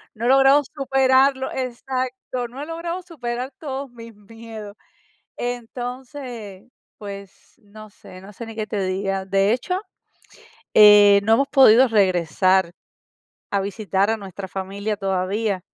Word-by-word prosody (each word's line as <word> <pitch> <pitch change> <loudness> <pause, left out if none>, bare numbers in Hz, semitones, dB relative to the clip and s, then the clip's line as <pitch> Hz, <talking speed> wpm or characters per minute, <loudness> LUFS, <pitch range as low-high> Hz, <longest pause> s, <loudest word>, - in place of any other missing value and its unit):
no 225 +2 -5
he - - +2
logrado 270 +2 +5
superarlo. 265 -1 +2
Exacto, 255 0 -4
no 245 +3 -12
he - - -6
logrado 335 +3 -5
superar 255 -6 -5
todos 275 -4 -6
mis 230 -2 -12
miedos. 220 0 -11 0.6
Entonces, 245 -3 -7 0.3
pues, 200 -2 -11
no 215 +1 -13
sé, 185 -2 -14
no 200 +2 -13
sé 235 - -8
ni 225 0 -10
qué 215 -1 -4
te 205 -2 -2
diga. 195 +1 -2
De 195 +1 +2
hecho, 365 - -2 0.9
eh, 205 -1 +8
no 220 - +4
hemos 275 +5 +2
podido 260 -2 +6
regresar 185 -2 +2 0.8
a 200 - 0
visitar 200 0 -1
a 225 - -1
nuestra 195 -1 -8
familia 200 +3 -4
todavía. 195 +1 -1
225 Hz, 135 wpm, -22 LUFS, 200-260 Hz, 0.9 s, eh